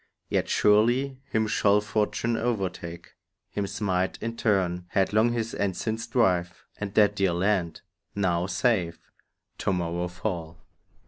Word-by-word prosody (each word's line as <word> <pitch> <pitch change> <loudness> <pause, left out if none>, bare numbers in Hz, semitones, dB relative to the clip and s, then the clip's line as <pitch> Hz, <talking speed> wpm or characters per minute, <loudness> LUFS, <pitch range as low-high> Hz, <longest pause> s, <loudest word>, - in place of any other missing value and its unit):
Yet - - 0
surely 120 +6 +3
him 110 0 +1
shall 105 -1 +3
fortune 105 +2 0
overtake, 95 -7 -3 0.4
Him 100 -1 -2
smite 95 -2 -1
in 115 0 -4
turn, 95 -6 +1
headlong 105 +5 +2
his 115 -1 -2
ensigns 110 +3 -2
drive; 90 -8 +1
And 105 -2 -3
that 105 -1 +5
dear 95 -3 +2
land, 90 -1 0 0.3
now 90 -3 +1
safe, 90 -2 0 0.5
to - - 0
morrow 85 -1 -1
fall. 90 -3 -4
100 Hz, 125 wpm, -27 LUFS, 90-110 Hz, 0.5 s, that